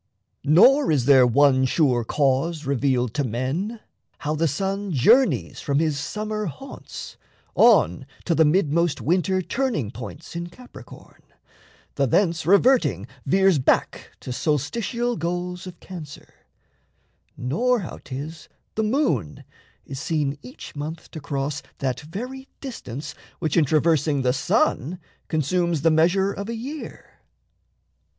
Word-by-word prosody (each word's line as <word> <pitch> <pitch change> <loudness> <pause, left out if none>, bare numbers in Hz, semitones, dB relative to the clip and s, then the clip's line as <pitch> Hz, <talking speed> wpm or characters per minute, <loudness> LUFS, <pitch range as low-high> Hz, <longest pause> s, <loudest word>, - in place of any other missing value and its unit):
Nor 260 - +6
is 135 -6 +2
there 130 -2 +6
one 130 +1 +4
sure 130 -3 +2
cause 145 +5 0
revealed 130 -3 0
to 145 - 0
men 140 - -3 0.4
How 150 - -2
the 160 +2 +1
sun 195 +6 -2
journeys 230 - +3
from 140 -2 0
his 155 -2 +1
summer 215 +5 -3
haunts 150 - -9 0.4
On 90 - +4 0.2
to 170 - +1
the 160 - +4
mid 155 -1 +2
most 170 -1 +1
winter 185 +3 +1
turning 235 - -1
points 130 +7 -9
In 170 0 -4
Capricorn, 250 +8 -14 0.8
the 140 -1 +2
thence 170 - +1
reverting 185 - +4 0.2
veers 190 0 +4
Back 130 - +1
to 125 - -5
solstitial 230 - -1
goals 180 +2 -3
of 175 -2 -10
Cancer; 160 -6 -10 1.0
nor 235 - +1
How 170 - -7
'tis 145 +5 -7 0.2
the 220 - -1
moon 210 - 0 0.4
is 135 -1 -7
seen 145 -2 -1
each 125 +3 -11
month 155 +3 -6
to 160 - -7
cross 140 0 -3 0.2
That 130 -2 -2
very 250 - -7
distance 150 - -7 0.2
which 155 -4 -2
in 165 - +4
traversing 150 -1 +2
The 125 -1 +2
sun 140 +4 0 0.3
consumes 165 0 0
the 165 - +5
measure 180 +5 +3
of 200 +2 -6
a 235 - -3
year. 275 +7 -8
160 Hz, 130 wpm, -23 LUFS, 140-195 Hz, 1.0 s, Nor